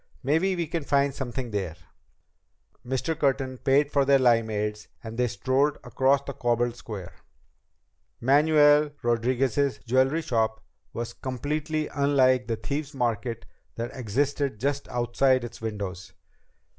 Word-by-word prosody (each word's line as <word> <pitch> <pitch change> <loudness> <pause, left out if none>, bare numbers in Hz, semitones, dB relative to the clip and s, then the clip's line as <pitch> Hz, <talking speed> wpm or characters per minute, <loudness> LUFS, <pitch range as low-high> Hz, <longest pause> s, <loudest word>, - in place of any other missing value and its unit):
Maybe 165 +8 +2
we 170 -1 -1
can 165 0 -3
find 140 0 +2
something 130 -2 -5
there." 95 -6 -3 1.1
Mr. 130 +6 -2
Curtin 135 -4 0
paid 140 +1 +2
for 140 - +3
their 140 0 +5
limeades, 110 -4 +1 0.2
and 110 0 -7
they 125 +1 +1
strolled 130 +7 +1
across 135 +1 +2
the 140 - -6
cobbled 120 -2 0
square. 105 -7 -8 1.1
Manuel 150 +2 +5
Rodriguez's 125 +3 +1
jewelry 130 +6 +2
shop 110 -3 0 0.3
was 120 0 -5
completely 150 +4 -3
unlike 130 -3 +2
the 115 - 0
Thieves' 140 +6 -4
Market 115 -2 -2 0.3
that 115 +1 -5
existed 135 +1 -1
just 140 +3 -1
outside 125 +1 +1
its 120 -1 -8
windows. 100 -5 -5
130 Hz, 125 wpm, -26 LUFS, 115-140 Hz, 1.1 s, their